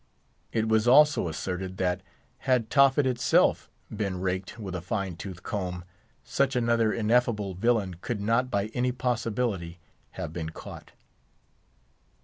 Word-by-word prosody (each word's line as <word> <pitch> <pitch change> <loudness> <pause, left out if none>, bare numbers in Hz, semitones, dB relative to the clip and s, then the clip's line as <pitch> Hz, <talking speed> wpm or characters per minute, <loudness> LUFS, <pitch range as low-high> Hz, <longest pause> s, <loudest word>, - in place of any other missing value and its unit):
It 110 -1 0
was 110 +1 +2
also 145 -4 +6
asserted 90 +3 -4
that, 90 0 0 0.5
had 120 -4 +2
Tophet 140 0 +5
itself 125 -2 +2 0.3
been 100 -3 -2
raked 95 +2 -3
with 100 -5 -6
a 90 - -3
fine 95 -1 -3
tooth 90 0 -8
comb, 90 -3 -3 0.4
such 135 -1 0
another 115 -2 +2
ineffable 110 -3 +1
villain 100 -1 +1
could 115 -4 -3
not 115 +5 +1
by 100 -2 -1
any 125 0 +1
possibility 115 -8 -2 0.4
have 75 - -5
been 80 -2 -4
caught. 80 - -10
110 Hz, 130 wpm, -27 LUFS, 95-120 Hz, 0.5 s, also